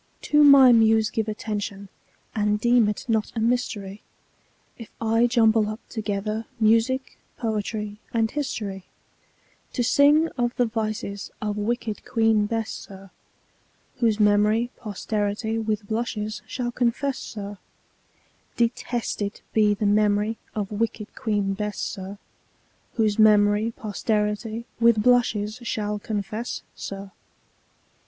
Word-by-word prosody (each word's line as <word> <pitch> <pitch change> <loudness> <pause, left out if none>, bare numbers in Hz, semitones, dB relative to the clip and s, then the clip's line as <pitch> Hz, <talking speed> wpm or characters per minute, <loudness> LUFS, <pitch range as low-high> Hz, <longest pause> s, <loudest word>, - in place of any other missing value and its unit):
To 295 0 +4
my 275 -3 +9
Muse 220 -2 +4
give 220 -1 -1
attention, 205 -2 -4 0.5
and 210 -1 +1
deem 240 -1 +4
it 210 - -4
not 220 -2 0
a - - -1
mystery 220 -4 -1 0.7
If 230 - -11
I 225 +1 +3
jumble 225 -3 +3
up 215 +1 -5
together 215 0 -3
music, 230 +4 +2 0.2
poetry, 210 -2 -3
and 225 -1 +1
history, 210 -10 -4 0.9
To 245 - 0
sing 290 +6 +5
of 240 0 0
the 245 - +2
vices 215 -2 -3
of 210 -1 -2
wicked 215 0 -2
Queen 225 -2 +2
Bess, 225 0 -2
sir, 195 -1 -10 0.9
Whose 225 -3 +1
memory 210 +3 +3
posterity 215 +1 -2
with 215 -1 -2
blushes 220 -1 -3
shall 245 -2 -3
confess, 255 +3 0
sir, 205 -2 -7 1.0
Detested 235 -3 -2
be 210 -1 +4
the 210 - -2
memory 210 +1 +2 0.2
of 205 -2 -3
wicked 215 0 -3
Queen 205 -3 -1
Bess, 210 0 -4
sir, 195 +1 -5 0.8
Whose 215 -2 +1
memory 210 0 +5
posterity 215 +1 -2
with 230 -2 +4
blushes 220 -3 +2
shall 210 -3 -2
confess, 210 +2 -4
sir. 195 0 -7
215 Hz, 120 wpm, -24 LUFS, 210-230 Hz, 1.0 s, my